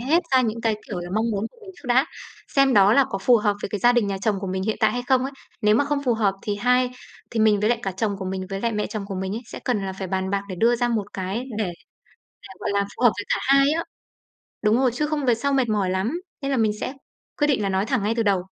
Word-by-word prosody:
hết 310 +8 +2
ra 260 - +6
những 230 -2 -1
cái, 225 -2 +1
kiểu 190 - -4
là, 175 0 -7
mong 220 +1 +1
muốn 205 +1 -1
của - - -24
mình 400 -3 -11
trước - - -14
đã, 260 +5 +4 0.5
xem 275 -2 +5
đó 200 +1 +6
là 275 +2 +5
có 195 - -2
phù 240 +5 +5
hợp 210 -2 +1
với - - -2
cái 205 +1 -3
gia 240 +4 +5
đình 240 -4 +2
nhà 195 -1 -2
chồng 210 -1 +1
của 195 - -4
mình 190 0 -2
hiện 220 +2 -1
tại 220 - +3
hay 245 0 -2
không 260 -1 +4
ấy. 275 - -4 0.3
Nếu 210 0 +4
mà 285 - +3
không 285 0 -1
phù 245 -3 +2
hợp 205 -3 +1
thì 205 -1 -2
hai 250 +3 +2 0.4
thì 230 - -1
mình 215 -2 +4
với 210 - +2
lại 240 -1 +2
cả 195 - -2
chồng 200 +1 -1
của 190 - -5
mình, 185 0 -3
với 195 0 -3
lại 235 -1 0
mẹ 210 -1 -1
chồng 215 -2 -5
của 195 - -5
mình 190 +2 -3
ấy, 235 - -5
sẽ - - -8
cần 210 -6 0
là 190 - -3
phải 190 0 -5
bàn 190 0 -1
bạc 200 0 0
để 185 - -4
đưa 235 +1 +4
ra 240 0 +1
một 210 -3 -2
cái 195 +6 -3
để 215 - +1 0.8
để, - - -12
gọi - - -2
là, 200 - +2 0.2
phù - - -6
hợp 240 - +7
với 205 - -3
cả - - +1
hai 275 +1 +5
á. 325 +2 0 0.8
Đúng 215 +1 +4
rồi, 260 -1 +3
chứ 300 +4 0
không 295 -2 -2
về 245 - +4
sau 280 +5 -1
mệt 265 -3 +2
mỏi 205 -4 +1
lắm, 210 - -1 0.2
nên 275 - -1
là 270 - +1
mình 220 -3 +2
sẽ 255 - -3 0.5
quyết 295 - +3
định 270 -7 +1
là 200 - 0
nói 195 +2 0
thẳng 260 -7 0
ngay 215 +3 0
từ 230 - +1
đầu. 195 -4 +2
220 Hz, 305 wpm, -23 LUFS, 200-250 Hz, 0.8 s, hợp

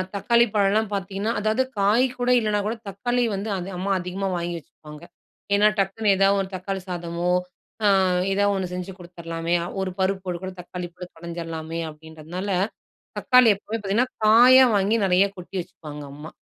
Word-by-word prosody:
தக்காளி 235 +4 +3
பழம்லாம் 205 +1 +2
பார்த்தீங்கன்னா 200 +3 -2
அதாவது 215 +5 +1 0.2
காய் 215 +6 +4
கூட 245 0 0
இல்லன்னாகூட 210 0 -1
தக்காளி 245 +5 -1
வந்து 205 +3 -4
அது 180 +1 -5
அம்மா 195 +2 -2
அதிகமா 185 +2 -3
வாங்கி 170 0 -3
வச்சுப்பாங்க. 150 +1 -14 0.5
ஏன்னா 210 +1 +5
டக்குனு 200 +2 0
ஏதாவது 195 0 +4
ஒரு 190 - -5
தக்காளி 190 +1 -4
சாதமோ! 175 0 -3 0.6
ஆ - - +6 0.4
எதா 205 +1 +2
ஒண்ணு 185 -2 -3
செஞ்சு 180 +1 -5
கொடுத்துர்லாமே! 170 -1 -4 0.3
ஒரு 185 -1 -2
பருப்பு 190 -1 -1
கூட 190 - -4
தக்காளி 180 0 -7
போட்டு 180 0 -9
பிணஞ்சிர்லாமே! 165 -1 -6
அப்பிடின்றதுனால 160 +5 -8 0.7
தக்காளி 250 -3 +5
எப்பவுமே 220 +3 -5
பார்த்தீங்கன்னா, 210 +6 0 0.2
காயா 250 +4 +8
வாங்கி 200 +3 +2
நிறையா 190 +2 +4
கொட்டி 180 +2 -10
வச்சுப்பாங்க, 150 -4 -10
அம்மா. 150 +3 -9
190 Hz, 150 wpm, -24 LUFS, 175-210 Hz, 0.7 s, காயா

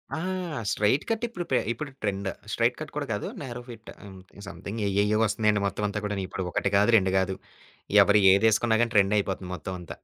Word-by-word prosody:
ఆ! - - -3 0.5
Straight 105 +7 +2
cut 225 +1 -1
ఇప్పుడు 180 -7 -6
pay 130 - +4
ఇప్పుడు 135 +5 -5
ట్రెండ. 100 -1 -2 0.2
స్ట్రెయిట్ 120 +1 +1
కట్ 155 -1 -7
కూడా 150 - -2
గాదు, 105 -1 -2
న్యారో 125 -3 -6
ఫిట్ 115 -2 -11
హ్మ్. 95 -2 -11 0.3
సమ్‌థింగ్ 110 +3 -7
ఏయ్యేయ్యో 100 +2 +2
వస్తున్నయండి 105 -1 +1
మొత్తం 105 - -4
అంతా 105 +1 -3
కూడాని 100 -2 -2
ఇప్పుడు 95 - -4
ఒకటి 100 - 0
కాదు, 105 +3 +3
రెండు 95 -2 +1
గాదు, 95 0 0 0.7
ఎవ్వరు 105 +1 +4
ఏదేసుకున్న 110 +2 +3
గాని 120 0 -3
ట్రెండ‌యిపోతుంది 95 -2 +1
మొత్తం 95 +1 -6
అంతా. 85 - -9
105 Hz, 185 wpm, -26 LUFS, 100-120 Hz, 0.7 s, pay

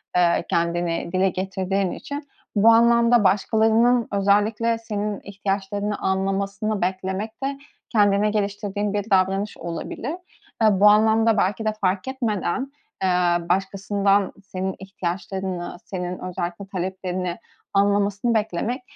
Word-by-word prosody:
eee, 170 -1 +3
kendini 170 0 0
dile 185 +1 +3
getirdiğin 190 0 -1
için 285 0 -6 0.3
bu 215 +3 +6
anlamda 235 0 +5
başkalarının 220 +4 +3
özellikle 210 +3 +2
senin 210 -2 -3
ihtiyaçlarını 200 +1 -3
anlamasını 195 +2 -1
beklemek 190 +6 -3
de 275 0 -2 0.3
kendine 205 -1 +3
geliştirdiğin 205 0 -2
bir 205 +1 -2
davranış 195 +2 +1
olabilir. 170 - -5 0.5
Eee, 220 - +7
bu 200 +2 +5
anlamda 220 +1 +4
belki 200 +4 0
de 215 - +1
farketmeden, 220 +4 -1 0.3
eee, 190 - +3 0.4
başkasından 195 +1 +1
senin 190 0 -4
ihtiyaçlarını, 190 -1 -4
senin 180 -1 -4
özellikle 180 +1 -4
taleplerini 185 -1 -3 0.4
anlamasını 200 +3 +2
beklemek 220 +4 -1
200 Hz, 110 wpm, -23 LUFS, 190-215 Hz, 0.5 s, Eee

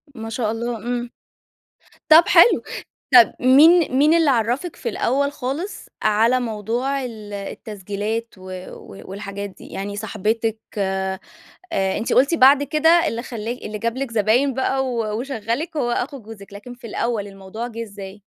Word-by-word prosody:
ما 225 -1 -6
شاء 225 -1 -1
الله 235 +1 -3
امم، 240 +2 -4 1.0
طب 320 +2 +9
حلو، - - +6 0.5
طب 240 -2 +8
مين 290 +4 +6
مين 300 +3 +5
اللي 325 -3 +4
عرفِك 250 +7 -1
في 240 - -4
الأول 275 +6 0
خالص، 285 +10 -5 0.2
على 225 +4 +3
موضوع 240 +4 -2
ال 215 -4 -8
التسجيلات 205 +2 -5
و - - -15 0.3
و 100 - -12
والحاجات 200 0 -6
دي، - - -14
يعني 200 +1 -6
صاحبتِك، 220 +1 -2 0.2
آآ 190 -1 -1 0.6
أنتِ 195 +3 -1
قلتِ 275 +6 +4
بعد 275 -1 +6
كده 305 +2 +1 0.2
اللي 230 +1 -4
خلا 230 -3 -6
اللي 215 -3 -6
جاب 230 +2 -2
لِك 270 -1 -3
زباين 230 +5 +2
بقى 265 +1 0
و 225 -3 -2
وشغَّلِك 265 +5 -3
هو 245 -5 0
أخو 265 +3 -3
جوزِك 210 -2 -12
لكن 230 +5 -10
في 240 -1 -12
الأول 225 -1 -2
الموضوع 195 +4 -7
جِه 230 -1 -6
إزاي؟ 200 -2 -10
230 Hz, 155 wpm, -21 LUFS, 210-260 Hz, 1.0 s, طب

